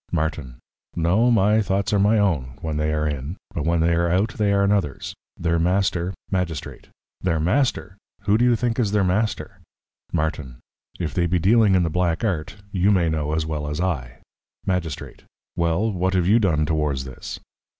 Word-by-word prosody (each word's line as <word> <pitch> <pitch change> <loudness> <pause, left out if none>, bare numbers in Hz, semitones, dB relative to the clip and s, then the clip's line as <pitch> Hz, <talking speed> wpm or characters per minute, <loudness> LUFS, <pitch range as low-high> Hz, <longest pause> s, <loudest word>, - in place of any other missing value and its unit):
Martin. 75 -6 -2 0.4
No, 90 +9 +3
my 110 -1 +4
thoughts 100 0 0
are 100 - +3
my 105 +3 +4
own, 70 - 0
when 80 -2 -2
they 75 0 0
are 75 0 0
in, 75 +4 -4 0.2
but 75 - -3
when 85 -1 +2
they 85 +1 +3
are 85 +1 +1
out 95 +6 +2
they 105 -2 +1
are 100 0 +3
anothers. 100 -8 -1 0.2
Their 85 0 0
Master. 90 0 +1 0.2
Magistrate. 90 -6 -3 0.3
Their 85 -4 0
Master? 100 - 0 0.2
who 100 +1 +2
do 115 - +3
you 125 -1 +4
think 120 0 -1
is 105 -4 +1
their 105 -2 +3
Master? 105 +4 -1 0.5
Martin. 75 -6 -2 0.4
If 85 -3 -3
they 85 -1 +1
be 90 +2 +1
dealing 105 +3 +4
in 90 - +3
the 80 - -1
Black 85 +1 0
Art, 90 -7 -2 0.2
you 95 +1 +2
may 90 -5 +3
know 75 -1 -1
as 80 0 0
well 75 -2 -3
as 75 +2 -3
I. 70 -10 -3 0.4
Magistrate. 90 -6 -3 0.3
Well, 85 +6 +1
what 95 0 0
have 90 -2 +2
you 105 +6 +5
done 80 -8 +2
towards 75 -4 0
this? 65 -2 -8
85 Hz, 185 wpm, -23 LUFS, 80-100 Hz, 0.5 s, you